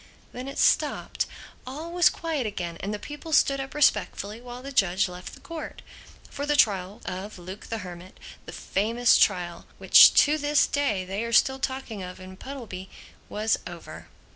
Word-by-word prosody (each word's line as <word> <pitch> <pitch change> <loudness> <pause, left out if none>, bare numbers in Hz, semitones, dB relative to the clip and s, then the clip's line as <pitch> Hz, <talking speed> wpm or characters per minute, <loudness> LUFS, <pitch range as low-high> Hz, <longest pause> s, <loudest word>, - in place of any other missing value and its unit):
Then 250 +2 -7
it 275 - -7
stopped. - - +1 0.4
All 305 +6 -6
was 350 -2 +5
quiet 315 -8 -3
again; 175 -5 -5
and 200 - -4
the 210 - -3
people 295 +7 -9
stood 275 -2 +3
up 270 +1 -6
respectfully 215 -5 +1
while 245 0 -9
the 275 - -7
judge 195 -7 +2
left 180 0 -9
the - - -16
Court. 330 -2 -8 0.4
For 285 +1 -5
the 295 - +2
trial 200 -4 +2
of 190 +3 -6
Luke 185 +3 -9
the 225 - -3
Hermit, 180 +1 -11 0.3
that - - -8
famous 230 +4 +2
trial 175 -3 +1
which - - +8
to 300 +2 0
this 290 0 +3
day 215 -10 -1
they 195 +4 -3
are 235 - -4
still 265 +3 +3
talking 260 -6 -4
of 180 0 -8
in 185 0 -10
Puddleby, 205 -6 -8 0.4
was 215 +1 0
over. - - -10
225 Hz, 175 wpm, -26 LUFS, 190-275 Hz, 0.4 s, which